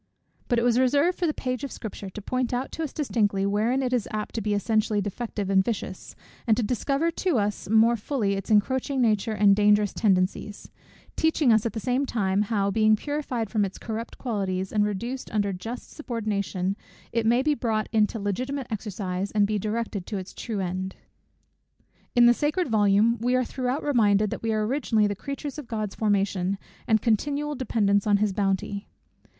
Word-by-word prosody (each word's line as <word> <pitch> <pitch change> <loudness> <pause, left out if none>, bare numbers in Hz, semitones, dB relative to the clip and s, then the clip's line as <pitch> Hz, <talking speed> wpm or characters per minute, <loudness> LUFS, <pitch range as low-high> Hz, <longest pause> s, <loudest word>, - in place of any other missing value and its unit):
But 240 - +1
it 235 - +2
was 245 0 +3
reserved 285 +7 +2
for 350 - +1
the - - +2
page 255 -4 -3
of 280 - -4
Scripture 205 -3 -7
to 210 - -8
point 255 +1 -1
out 255 +2 -3
to - - -5
us 310 - -2
distinctly, 205 -9 0
wherein 220 +7 +1
it 255 -1 -1
is 240 -5 0
apt 215 0 -4
to 225 - -2
be 210 0 0
essentially 215 0 +1
defective 205 0 -3
and 190 -1 +4
vicious, 190 -3 -5 0.3
and 220 - +4
to 245 - +1
discover 275 +8 0
to 340 -3 0
us 205 -2 -2
more 225 +2 +5
fully 215 -2 -1
its 195 +1 -4
encroaching 260 +6 +2
nature 220 -2 +2
and 205 -1 +5
dangerous 210 0 +3
tendencies; 200 +1 0 0.4
teaching 315 -6 +3
us 220 +1 +3
at - - -5
the 225 - -3
same 255 +4 0
time, 195 -4 +1
how, 200 -2 0
being 215 +1 +4
purified 255 -4 -3
from 215 -3 +2
its 195 -1 -4
corrupt 225 0 -6
qualities, 190 -6 -2
and 210 -1 +3
reduced 235 +6 -4
under 205 -2 0
just 225 +7 -7
subordination, 205 - -2 0.4
it 230 -1 0
may 240 +3 +4
be 300 +1 +3
brought 225 -5 -1
into 215 +1 +2
legitimate 255 +7 -2
exercise, 195 -3 -3
and 205 -1 +3
be 210 0 -1
directed 215 -2 -3
to 210 - -3
its 185 0 -7
true 220 -3 -4
end. 185 +1 -3 1.2
In 240 0 +7
the 240 - +7
sacred 300 +7 0
volume 215 +1 +3
we 250 +2 +2
are 255 0 +2
throughout 255 +3 -2
reminded, 210 -7 +3
that - - -4
we 225 - -1
are 215 -1 +1
originally 225 -3 +1
the 205 0 -1
creatures 280 +6 -6
of 285 - -9
God's 215 -3 -3
formation, 200 -3 0 0.3
and 220 -1 +3
continual 290 +6 0
dependents 210 -6 +1
on 205 -1 +5
his 205 -1 +1
bounty. 200 0 -1
220 Hz, 190 wpm, -26 LUFS, 200-250 Hz, 1.2 s, In